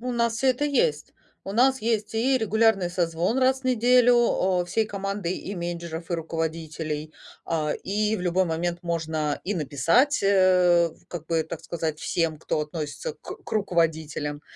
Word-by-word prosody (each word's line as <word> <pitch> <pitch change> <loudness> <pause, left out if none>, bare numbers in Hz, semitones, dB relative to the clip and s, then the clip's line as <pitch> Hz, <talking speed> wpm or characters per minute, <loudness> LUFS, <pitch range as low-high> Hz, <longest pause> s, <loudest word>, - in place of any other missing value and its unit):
У 250 +1 -3
нас 235 -1 +1
всё 265 +2 +1
это 255 +3 +1
есть. 195 - 0 0.3
У 195 - -5
нас 260 +4 +3
есть 215 -2 -1
и 260 +4 +2
регулярный 220 -4 +2
созвон 175 +5 0
раз 265 0 +3
в - - -28
неделю, 245 0 +4 0.4
а, - - -1
всей 205 +6 0
командой, 195 -3 -3
и 200 - -6
менеджеров, 170 -1 -5
и - - +1
руководителей. 160 -2 -4 0.3
А, 155 -2 -1
и 210 +2 0
в - - -6
любой 180 +1 +1
момент 170 +2 -2
можно 160 -3 -2
и 205 +2 -1
написать, 165 - +2
э, 180 -3 +4 0.2
как 165 -3 -7
бы 165 -1 0
так 160 - -7
сказать 160 -2 -4
всем, 165 -2 -1
кто 155 - -2
относится 150 -1 -5
к - - -11
к - - -11
руководителям. 160 -6 -1
175 Hz, 165 wpm, -25 LUFS, 160-220 Hz, 0.4 s, неделю